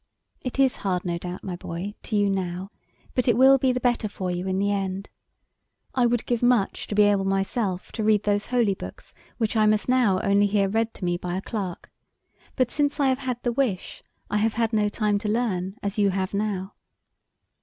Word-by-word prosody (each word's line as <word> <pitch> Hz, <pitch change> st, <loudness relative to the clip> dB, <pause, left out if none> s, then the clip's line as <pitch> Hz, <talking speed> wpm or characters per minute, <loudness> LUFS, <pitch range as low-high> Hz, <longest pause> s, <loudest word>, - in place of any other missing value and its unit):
"It 255 Hz, -, -5 dB
is 270 Hz, -2 st, +3 dB
hard, 185 Hz, -2 st, -2 dB
no 170 Hz, -1 st, -1 dB
doubt, 180 Hz, +1 st, -6 dB
my 185 Hz, -2 st, -4 dB
boy, 175 Hz, +3 st, -5 dB
to 220 Hz, -, -4 dB
you 205 Hz, -1 st, +3 dB
now, 190 Hz, 0 st, -2 dB, 0.4 s
but 250 Hz, -, 0 dB
it 235 Hz, -2 st, +4 dB
will 270 Hz, +1 st, +7 dB
be 260 Hz, 0 st, +3 dB
the 250 Hz, -, -1 dB
better 240 Hz, -3 st, +1 dB
for 185 Hz, -2 st, -4 dB
you 180 Hz, +1 st, -3 dB
in 190 Hz, 0 st, 0 dB
the 200 Hz, +1 st, +1 dB
end. 195 Hz, -1 st, -3 dB, 0.8 s
I 250 Hz, -2 st, +3 dB
would 240 Hz, -1 st, 0 dB
give 240 Hz, -2 st, 0 dB
much 245 Hz, -5 st, +2 dB
to 205 Hz, -, -3 dB
be 210 Hz, -, +6 dB
able 205 Hz, -1 st, +3 dB
myself 195 Hz, 0 st, -1 dB
to 220 Hz, -, -3 dB
read 215 Hz, -1 st, +3 dB
those 205 Hz, 0 st, 0 dB
holy 240 Hz, -5 st, +2 dB
books -, -, -10 dB, 0.2 s
which 225 Hz, -1 st, -1 dB
I 215 Hz, -1 st, +4 dB
must 210 Hz, 0 st, +2 dB
now 245 Hz, -7 st, +3 dB
only 200 Hz, +1 st, +3 dB
hear 200 Hz, -1 st, +2 dB
read 225 Hz, +3 st, -1 dB
to 185 Hz, -, -5 dB
me 175 Hz, 0 st, 0 dB
by 180 Hz, +1 st, -3 dB
a -, -, -3 dB
clerk, 195 Hz, -6 st, -5 dB, 0.6 s
but 255 Hz, -2 st, +1 dB
since 290 Hz, -1 st, 0 dB
I 275 Hz, -2 st, +4 dB
have 260 Hz, 0 st, +1 dB
had 250 Hz, -3 st, -4 dB
the 240 Hz, -, +1 dB
wish, 235 Hz, -7 st, -2 dB, 0.3 s
I 210 Hz, -, 0 dB
have 220 Hz, +1 st, +1 dB
had 230 Hz, 0 st, 0 dB
no 210 Hz, -1 st, +2 dB
time 210 Hz, -1 st, 0 dB
to 210 Hz, 0 st, -3 dB
learn 205 Hz, -4 st, -1 dB
as 200 Hz, +1 st, -2 dB
you 200 Hz, -1 st, +4 dB
have 190 Hz, 0 st, -2 dB
now." 200 Hz, -2 st, -2 dB
205 Hz, 220 wpm, -25 LUFS, 190-235 Hz, 0.8 s, will